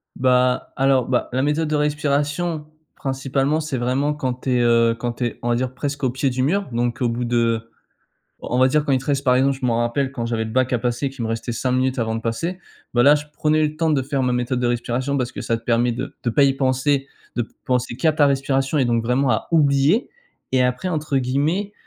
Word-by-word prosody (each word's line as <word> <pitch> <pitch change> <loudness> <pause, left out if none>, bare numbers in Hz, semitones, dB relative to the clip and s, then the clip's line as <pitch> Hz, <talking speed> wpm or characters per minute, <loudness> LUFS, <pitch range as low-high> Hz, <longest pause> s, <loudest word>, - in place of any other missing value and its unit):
Bah, 125 0 +2
alors, 135 -2 +2
bah, 125 -1 0
la 130 - +1
méthode 150 +3 0
de 155 - 0
respiration 150 +2 -1 0.3
principalement, 135 +2 -1
c'est 150 -4 -3
vraiment 130 +4 0
quand 130 -3 -3
tu 130 - -1
es, 120 - +2
heu, 115 -1 +3
quand 120 -1 -3
tu 120 - -3
es, 120 - -4
on 120 - -2
va 120 - +2
dire, 125 +1 -2
presque 145 +1 -4
au 130 - +3
pied 130 +2 0
du 130 0 -1
mur 195 +7 0
donc 120 +1 -1
au 120 - +2
bout 120 +1 -2
de 115 -1 0 0.7
on 125 - -2
va 130 - +6
dire, 150 +3 +1
quand - - 0
il 130 - +3
te 135 - -11
reste, 140 -1 0
par 125 -2 +4
exemple, 135 +1 +2
je 130 - -3
m'en 115 -2 +1
rappelle, 130 +3 0
quand 120 -4 -4
j'avais 115 -1 -1
le 110 - -6
bac 130 +2 +1
à 125 - +2
passer, 120 +3 -1
qu'il 135 -3 -6
me 110 - -2
restait 115 +1 -3
5 125 +2 -1
minutes 130 +1 +1
avant 110 -1 -1
de 115 - -4
passer, 165 +12 -3 0.3
bah, 120 - +4
là, 145 +4 +7
je 150 0 -4
prenais 155 +1 +2
le 150 0 -4
temps 160 0 0
de 145 -3 +2
faire 135 0 -1
ma 125 -1 +1
méthode 125 +1 -1
de 125 - +1
respiration 120 +3 -1
parce 125 -2 -2
que - - -6
ça 115 - -1
te 115 - -16
permet 120 +1 +2
de 125 +4 -5
de 120 - +1
pas 140 +5 +3
y 135 -1 +4
penser, 135 +1 +1 0.3
de 120 -2 -1 0.2
penser 125 -2 0
qu'à 160 -2 +3
ta 150 -1 +4
respiration 135 +1 0
et 135 - +3
donc 115 -1 +1
vraiment 125 +2 +1
à 110 - -1
oublier, 150 - +3 0.4
et 130 -1 +3
après, 125 +8 0
entre 150 -4 -1
guillemets, 150 +11 0
130 Hz, 250 wpm, -21 LUFS, 120-145 Hz, 0.7 s, là